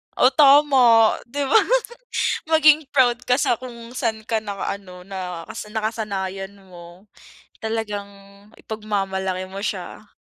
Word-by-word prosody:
Oh 255 - +4
tama, 270 -6 +5
di 285 +4 -3
ba? 275 +10 +4 0.9
Maging 310 -2 +5
proud 250 -4 +2
ka 250 - +4
sa 240 -4 0
kung 235 -2 -10
saan 225 -3 -2
ka 225 0 -1
naka 200 -2 -4
ano 180 -2 -13
nakas 190 +2 -7
nakasanayan 200 -3 -4
mo. 180 -1 -15 0.6
Talagang 215 -2 -3 0.5
ipagmamalaki 195 -3 -3
mo 195 +1 -8
siya. 200 +1 -6
215 Hz, 115 wpm, -22 LUFS, 195-245 Hz, 0.9 s, tama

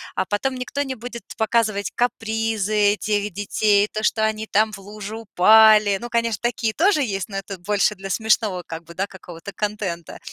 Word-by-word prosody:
а 190 - 0
потом 255 +7 -1
никто 255 +3 -3
не 265 -2 -5
будет 235 0 -8
показывать 220 -2 0
капризы 220 -3 +1
этих 210 0 -1
детей, 205 +1 +2
то, 215 - -4
что 220 0 +1
они 220 0 -1
там 215 +1 +2
в 195 - -8
лужу 205 +1 -8
упали. 215 0 +6
Ну, 240 - -6
конечно, 230 -3 0
такие 235 -2 -1
тоже 345 -2 +3
есть, 195 -5 -3
но 195 - -5
это 195 0 -6
больше 205 +3 +1
для 195 0 -8
смешного 215 -4 +1
как 165 +1 -7
бы, 170 +1 -13
да, 195 +3 -2
какого-то 180 -1 -10
контента. 205 -6 -4
210 Hz, 180 wpm, -22 LUFS, 195-225 Hz, -, упали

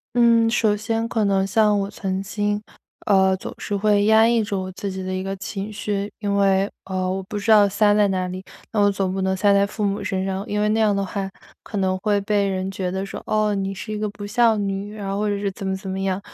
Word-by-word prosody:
嗯， 230 -1 +5
首 220 -2 +2
先 225 +2 -2
可 225 -2 0
能 195 -1 +2
像 210 0 +3
我 195 - -3
曾 195 -1 -3
经， 205 +1 -1 0.4
呃， 190 -2 +4
总 - - -8
是 205 - -3
会 205 0 +2
压 220 +1 +6
抑 235 -1 +3
住 200 -3 -2
我 185 0 -6
自 200 +1 -5
己 190 0 -5
的 185 0 -3
一 185 - -2
个 195 0 -4
情 195 +2 -5
绪， 205 -1 -3
因 205 -1 -1
为， 195 0 +3 0.2
呃， 185 -1 -2
我 190 0 -3
不 205 - -5
知 205 +2 -1
道 210 -2 +7
塞 205 +1 +3
在 210 -1 +4
哪 185 -1 -1
里， 185 +1 -6 0.3
那 210 - +1
我 205 - +5
总 195 -1 -1
不 190 - -2
能 190 0 0
塞 200 +2 +3
在 200 0 +4
父 210 +1 -4
母 200 0 -1
身 190 0 -2
上。 190 0 -2
因 210 0 0
为 210 - +2
那 220 - +1
样 210 -2 +3
的 200 - 0
话 195 +1 -3 0.3
可 - - -8
能 185 -1 +1
会 205 +1 +1
被 200 -1 +1
人 190 0 -2
觉 185 -1 -3
得 190 +1 -3
说： 195 - -7
“哦， 215 -1 +2
你 195 0 -2
是 215 +3 -6
一 210 - -3
个 215 0 -1
不 205 0 -8
孝 225 +1 +3
女。” 200 +1 -3
然 200 -2 -6
后 200 - -2
或 210 0 0
者 205 -1 -1
是 200 -1 -2
怎 195 - -8
么 190 0 -1
怎 190 0 -8
么 190 0 -3
样。 195 0 -1
200 Hz, 285 characters per minute, -22 LUFS, 190-210 Hz, 0.4 s, 道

